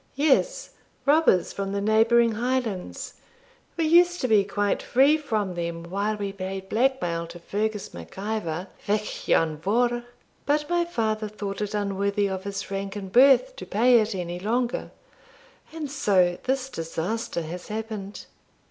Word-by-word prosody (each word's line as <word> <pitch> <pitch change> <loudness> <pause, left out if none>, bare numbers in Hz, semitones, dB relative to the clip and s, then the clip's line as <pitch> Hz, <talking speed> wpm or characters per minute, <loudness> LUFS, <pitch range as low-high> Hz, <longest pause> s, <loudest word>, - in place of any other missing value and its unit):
'Yes; 315 - +2 0.3
robbers 290 - +4
from 195 0 -3
the 200 - 0
neighbouring 225 +3 +4
Highlands. 230 -4 -2 0.6
We 330 - +1
used 350 +2 +5
to 255 - +1
be 215 -4 +5
quite 205 0 -1
free 275 +5 +4
from 215 -11 -2
them 170 -1 -4
while 200 +5 -2
we 200 -1 -4
paid 190 0 -6
blackmail 210 -9 0
to 175 - -10
Fergus 210 +3 -3
Mac 85 -1 -11
Ivor 190 -5 -3 0.2
Vich 210 +1 -2
Ian 160 -2 +3
Vohr; 240 +8 +1 0.4
but 295 +1 +1
my 345 0 +2
father 220 -9 -1
thought 205 -1 -5
it 210 0 -2
unworthy 200 0 0
of 190 0 -4
his 200 0 -5
rank 195 0 -3
and 195 -2 -6
birth 275 - +5
to - - -7
pay 240 +3 +5
it 215 -1 -1
any 175 -1 -4
longer, 235 +5 -1 0.8
and 310 -3 -5
so 185 -10 +2
this 265 0 0
disaster 170 0 -3
has 175 +3 -7
happened. 215 -2 -6
210 Hz, 150 wpm, -25 LUFS, 190-245 Hz, 0.8 s, used